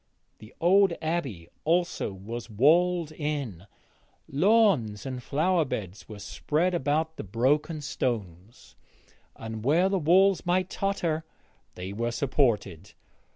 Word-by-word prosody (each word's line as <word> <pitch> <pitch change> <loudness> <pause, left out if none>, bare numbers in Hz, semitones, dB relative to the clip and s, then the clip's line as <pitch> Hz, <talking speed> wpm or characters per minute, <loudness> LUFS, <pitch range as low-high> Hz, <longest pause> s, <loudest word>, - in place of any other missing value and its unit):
The 110 +2 -13
old 190 +2 +4
Abbey 140 - -3 0.2
also 175 - 0
was 110 +5 -7
walled 165 - +3
in; 140 - -4 0.6
lawns 155 - +2
and 130 -2 -5
flower 165 +7 +1
beds 105 - -6
were 105 - -8
spread 160 - -1
about 160 0 0
the - - -5
broken 140 - 0
stones, 110 - -5 0.6
and 110 -1 -7
where 165 +9 +3
the 195 -1 +1
walls 185 +3 +4
might 185 +1 0
totter 170 -5 -1 0.5
they 95 +2 -6
were 115 +3 -1
supported. 120 - 0
145 Hz, 115 wpm, -27 LUFS, 110-175 Hz, 0.6 s, old